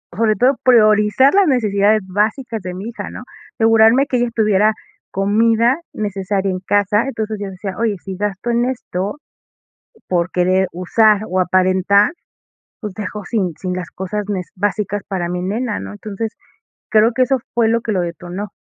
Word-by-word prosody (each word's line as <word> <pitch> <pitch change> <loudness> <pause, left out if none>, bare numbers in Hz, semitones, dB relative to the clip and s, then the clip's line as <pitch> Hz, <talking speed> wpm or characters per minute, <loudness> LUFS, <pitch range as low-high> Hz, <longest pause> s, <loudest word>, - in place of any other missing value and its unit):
sobre 215 +1 +2
todo 260 +2 +3
priorizar 215 +1 +4
las 395 -1 +4
necesidades 215 -5 +2
básicas 215 +3 -1
de 180 0 -6
mi 195 +5 -6
hija, 235 - -7
¿no? - - -9 0.4
Asegurarme 225 +4 +5
que 250 - 0
ella 240 0 +1
tuviera 215 -1 +3 0.4
comida 225 - +2
necesaria 195 -1 -2
en 185 - -3
casa, 205 +2 +2
entonces, 220 -4 -3
yo 200 - -4
decía: 190 0 -6
"Oye, 225 -2 0
si 190 -1 -6
gasto 205 +3 -3
en 235 +1 +1
esto 225 -3 -3 0.9
por 175 -1 0
querer 185 +1 +2
usar 210 +4 +3
o 185 +1 0
aparentar, 185 - +3 0.7
pues, 210 -5 -6
dejo 210 0 -6
sin 190 -5 -1
sin 185 -2 -4
las 180 -1 -5
cosas 190 +3 -4
nes 185 -3 -3
básicas 205 +1 -1
para 185 -3 -2
mi 180 0 -3
nena", 210 +4 -2
¿no? - - -7
Entonces, 210 +1 -5 0.6
creo 220 +2 +4
que 255 - 0
eso 270 +1 +1 0.2
fue 230 -2 +2
lo 230 +1 +2
que 225 - -3
lo 185 - +1
detonó. 175 +3 -5
210 Hz, 165 wpm, -18 LUFS, 190-225 Hz, 0.9 s, Asegurarme